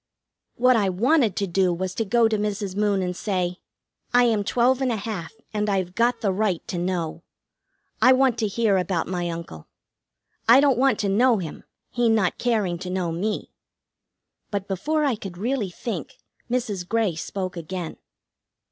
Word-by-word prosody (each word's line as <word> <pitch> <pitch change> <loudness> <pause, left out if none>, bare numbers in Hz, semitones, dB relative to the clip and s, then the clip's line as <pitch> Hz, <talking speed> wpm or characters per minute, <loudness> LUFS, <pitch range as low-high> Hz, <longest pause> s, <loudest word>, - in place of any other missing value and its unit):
What 255 +1 +4
I 205 -4 +2
wanted 230 - +2
to 200 - 0
do 185 0 +2
was 185 +2 -3
to 225 - -2
go 235 +2 +4
to 220 - 0
Mrs. 205 -2 -2
Moon 205 -2 +1
and 180 0 -2
say: 180 -3 -2 0.6
"I 245 - +7
am 225 -4 +2
twelve 250 +5 +2
and 260 -2 +1
a - - 0
half, 205 -5 -5 0.2
and 210 0 0
I've 185 -3 -1
got 235 +4 +1
the 205 -4 +1
right 195 -3 -1
to 175 - -2
know. 175 -2 -2 0.8
I 255 - +7
want 260 -2 +3
to 220 - +1
hear 205 -1 +2
about 180 -2 0
my 175 -1 -2
uncle. 165 - -7 0.8
I 245 +3 +9
don't 275 -4 +3
want 270 0 +3
to 205 - 0
know 230 +4 +4
him, 170 -6 -6 0.3
he 240 -1 +2
not 215 -5 +1
caring 210 -8 0
to 185 0 -6
know 180 -2 -1
me." 200 +6 -3 1.0
But 200 -1 -3
before 300 - 0
I 275 - +2
could 195 -5 -7
really 225 0 -1
think 225 +6 -6 0.3
Mrs. 215 -8 -2
Grey 225 -5 +1
spoke 185 +3 -4
again. 170 0 -5
205 Hz, 175 wpm, -24 LUFS, 180-235 Hz, 1.0 s, I